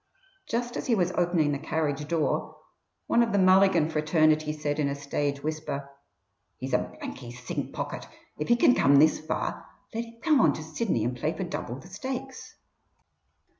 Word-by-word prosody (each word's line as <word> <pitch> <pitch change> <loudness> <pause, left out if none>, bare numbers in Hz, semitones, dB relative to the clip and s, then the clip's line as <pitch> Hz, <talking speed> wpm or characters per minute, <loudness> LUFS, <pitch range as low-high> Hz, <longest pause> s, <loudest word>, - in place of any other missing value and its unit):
Just 240 +1 -2
as - - -4
he 235 - +3
was 180 -3 +1
opening 175 -4 +1
the 140 - -2
carriage 150 -1 -2
door, 165 -2 -1 0.5
one 235 - +3
of 235 -1 +2
the 200 - +2
Mulligan 185 -3 +5
fraternity 155 -1 +2
said 150 -1 -3
in 145 -2 +1
a 140 - -2
stage 140 0 -2
whisper: 150 -3 -4 0.7
"He's 130 0 -5
a 125 - +5 0.2
blanky 120 -2 -7
sink 125 +1 -5
pocket. - - -5 0.3
If 150 - -2
he 240 - +5
can 245 +1 +5
come 140 - +4
this 155 +2 +5
far, 155 +1 -3 0.3
let 230 +1 -2
him 230 0 -16
come 300 -5 +4
on 150 - +5
to 155 - -6
Sydney 160 - -1
and 120 +2 -1
play 155 +6 -1
for 190 - -2
double 170 -8 -4
the 130 - -12
stakes." 265 0 -6
155 Hz, 180 wpm, -27 LUFS, 140-195 Hz, 0.7 s, Mulligan